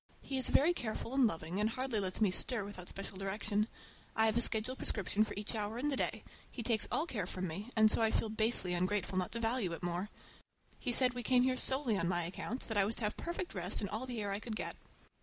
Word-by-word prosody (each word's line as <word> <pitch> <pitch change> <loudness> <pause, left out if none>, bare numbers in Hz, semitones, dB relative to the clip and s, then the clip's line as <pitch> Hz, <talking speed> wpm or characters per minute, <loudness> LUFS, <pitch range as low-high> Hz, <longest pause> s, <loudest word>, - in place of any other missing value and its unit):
He 270 -1 -2
is 260 - +8
very 320 +6 +4
careful 235 -3 -4
and 270 -3 +5
loving, 165 0 -3
and 210 +1 +2
hardly 255 -1 -1
lets 190 +1 +1
me 205 -4 +4
stir 225 +2 +2
without 185 -3 -4
special 195 -1 -5
direction. 205 +2 0 0.5
I 220 - +4
have 220 -1 +2
a 235 - +3
schedule 235 +2 +3
prescription 210 -3 +2
for 220 - -5
each 205 +3 -1
hour 215 0 -3
in 285 +4 -1
the 280 - +1
day; - - -2 0.3
he 235 - -6
takes 225 -1 +3
all 310 - +1
care 210 - -3
from 185 0 -4
me, 195 +8 -6
and 220 -1 +5
so - - +3
I 225 - +4
feel 220 - -1
basely 215 -4 +1
ungrateful 185 +1 -1
not 180 - -2
to 230 - 0
value 225 -6 0
it 165 - -7
more. 175 +3 -2 0.7
He 250 - -1
said 250 +1 +3
we 245 - -4
came 245 +2 +3
here 260 0 +2
solely 260 -5 0
on 170 - 0
my 175 -1 0
account, 210 +8 -5
that 220 - -2
I 200 - +5
was 220 +3 0
to - - -4
have 210 - -1
perfect 345 +1 -5
rest 180 0 0
and 200 - -3
all 235 +4 -3
the 245 -3 -4
air 205 -1 -2
I 200 - -2
could 220 0 -5
get. - - -4
215 Hz, 255 wpm, -34 LUFS, 195-245 Hz, 0.7 s, is